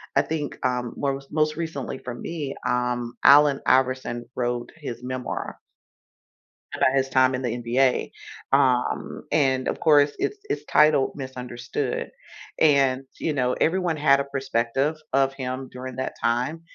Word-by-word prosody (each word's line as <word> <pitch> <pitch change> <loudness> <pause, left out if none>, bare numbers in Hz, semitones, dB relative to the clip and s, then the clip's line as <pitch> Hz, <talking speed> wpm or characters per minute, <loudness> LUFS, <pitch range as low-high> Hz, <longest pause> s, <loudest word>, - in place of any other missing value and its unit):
I - - +6
think, 155 -2 -4
um, 125 -1 -1
mors 135 -1 -2
most 155 0 +1
recently 160 -6 -4
for 125 - -6
me, 145 +3 -5
um, 125 -1 -1
Allen 145 -1 +7
Iverson 130 -2 +1
wrote 120 -1 -2
his 140 -6 -7
memoir 130 0 -4 1.2
about 130 - +3
his 135 0 +1
time 130 0 +3
in 125 - -4
the 125 - -1
NBA, 125 +2 +1 0.4
um, 130 -3 +1
and, 130 -3 +2
of - - -3
course, 145 -2 +5
it's 415 - -1
it's - - -2
titled 150 -3 +4
Misunderstood. 125 -1 -4 0.5
And, 135 -4 +4 0.2
you 160 - -1
know, 125 -3 +1
everyone 175 -1 +1
had 140 -2 +4
a - - -1
perspective 135 +1 -1 0.2
of 135 0 +2
him 130 0 -5
during 130 0 -7
that 130 - -3
time, 125 +8 0
130 Hz, 145 wpm, -24 LUFS, 125-145 Hz, 1.2 s, Allen